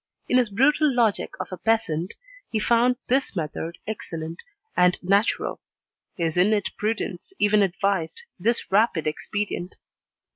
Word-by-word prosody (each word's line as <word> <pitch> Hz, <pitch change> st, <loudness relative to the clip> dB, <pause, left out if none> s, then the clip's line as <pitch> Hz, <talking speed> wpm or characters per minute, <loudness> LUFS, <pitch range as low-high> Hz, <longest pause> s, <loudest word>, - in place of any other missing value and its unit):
In 250 Hz, -, +4 dB
his 240 Hz, -3 st, +1 dB
brutal 290 Hz, +8 st, +3 dB
logic 235 Hz, -5 st, +1 dB
of 185 Hz, -, -4 dB
a 185 Hz, -, -5 dB
peasant, 195 Hz, -7 st, 0 dB, 0.3 s
he 225 Hz, -, -1 dB
found 235 Hz, +3 st, +3 dB
this 265 Hz, -3 st, +1 dB
method 165 Hz, 0 st, -4 dB
excellent 165 Hz, -6 st, -5 dB, 0.3 s
and 180 Hz, 0 st, +4 dB
natural. 200 Hz, +4 st, +1 dB, 0.5 s
His 165 Hz, -1 st, -1 dB
innate 205 Hz, +2 st, +3 dB
prudence 215 Hz, -, -3 dB
even 210 Hz, 0 st, +4 dB
advised 195 Hz, -, 0 dB, 0.2 s
this 230 Hz, +4 st, 0 dB
rapid 200 Hz, -5 st, +3 dB
expedient. 185 Hz, +3 st, -3 dB
205 Hz, 125 wpm, -25 LUFS, 175-225 Hz, 0.5 s, In